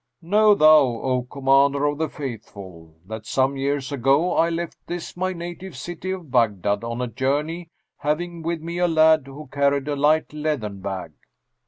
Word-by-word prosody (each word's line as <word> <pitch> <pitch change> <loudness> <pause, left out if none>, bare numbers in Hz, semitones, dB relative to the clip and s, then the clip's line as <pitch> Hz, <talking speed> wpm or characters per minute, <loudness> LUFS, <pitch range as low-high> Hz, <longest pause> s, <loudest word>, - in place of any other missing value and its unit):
Know 210 +4 +5
thou, 155 -3 +7 0.2
O 130 -1 0
Commander 140 +1 +3
of 145 0 -1
the 160 - 0
Faithful, 95 - -9
that 110 +1 -8
some 135 +1 +1
years 140 +1 -2
ago 140 +6 +2
I 165 - +3
left 170 0 -4
this 175 0 -6
my 185 +1 -1
native 175 -2 -7
city 175 +5 -6
of 180 -7 -5
Baghdad 105 -4 +1
on 115 +2 -3
a - - -2
journey, 145 +8 -2 0.3
having 170 +3 -2
with 165 0 -3
me 170 +1 -4
a 180 - +3
lad 160 -3 +4
who 140 +2 -10
carried 140 0 +1
a 145 - -1
light 150 +2 +2
leathern 145 -10 -3
bag. 95 -2 -5
145 Hz, 170 wpm, -23 LUFS, 130-165 Hz, 0.3 s, thou